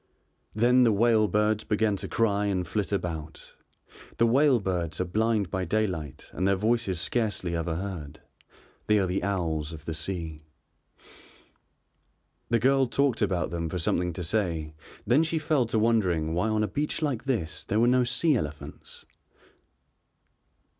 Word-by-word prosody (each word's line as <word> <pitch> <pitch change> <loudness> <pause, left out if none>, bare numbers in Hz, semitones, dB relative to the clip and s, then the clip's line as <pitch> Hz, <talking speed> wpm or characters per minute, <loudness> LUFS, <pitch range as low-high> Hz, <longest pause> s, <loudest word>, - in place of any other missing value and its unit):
Then 125 +3 +4
the 115 - +4
whale 110 0 +3
birds 105 +2 +1
began 105 -1 +1
to - - -5
cry 105 -3 +1
and 95 -3 -1
flit 105 +1 -2
about. 80 -5 -4 0.6
The 115 - +4
whale 130 +2 +4
birds 85 -5 -2
are 90 - 0
blind 110 +1 0
by 95 -2 -1
daylight 90 -9 -2
and 95 - 0
their 100 - +3
voices 110 -3 0
scarcely 105 -4 -1
ever 85 0 -2
heard, 80 -5 -6 0.7
they 105 - +4
are 100 - +2
the 90 +1 -1
owls 85 -6 -2
of 75 -1 -10
the 80 - -3
sea. 80 -1 -4 2.1
The 115 - +3
girl 135 +3 +3
talked 140 -1 +1
about 90 -4 0
them 85 -1 -3
for 90 - -3
something 90 +1 0
to 90 - -5
say, 85 -5 -1 0.3
then 125 +8 +4
she 160 0 0
fell 155 -6 +1
to 115 - -1
wondering 95 -8 +1
why 90 +6 0
on 110 0 +1
a - - +1
beach 150 - -2
like 130 -5 -1
this 100 - -2
there 105 - 0
were 115 - +4
no 125 +1 +4
sea 145 +5 +2
elephants. 75 - -6
100 Hz, 160 wpm, -27 LUFS, 85-115 Hz, 2.1 s, Then